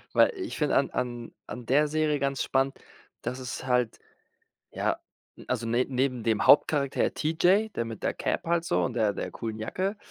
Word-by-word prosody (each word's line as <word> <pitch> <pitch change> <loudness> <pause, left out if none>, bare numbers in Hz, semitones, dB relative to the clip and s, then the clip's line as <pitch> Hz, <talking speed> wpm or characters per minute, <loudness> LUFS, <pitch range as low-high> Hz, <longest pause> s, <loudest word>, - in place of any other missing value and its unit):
Weil - - +6
ich 360 -4 -5
find 150 -2 +1
an 135 - +2
an 120 -2 -3 0.2
an 125 -2 -7
der 150 +5 +3
Serie 150 -1 +1
ganz 140 0 0
spannend, 135 0 0 0.5
dass 130 +1 -3
es 130 0 -6
halt, 125 -3 +1 0.7
ja - - -1 0.5
also 120 -2 -1
ne 120 +2 +2
neben 125 -2 0
dem 110 -1 +1
Hauptcharakter 140 -2 +4
T. 155 +1 -1
J. 195 +6 +3
der 115 - 0
mit 115 -2 -8
der - - +1
Cap - - -2
halt 170 0 +1
so - - +1
und 125 - -1
der 110 -3 +2
der - - -4
coolen 110 -2 -5
Jacke 190 - -2
135 Hz, 190 wpm, -28 LUFS, 120-155 Hz, 0.7 s, Weil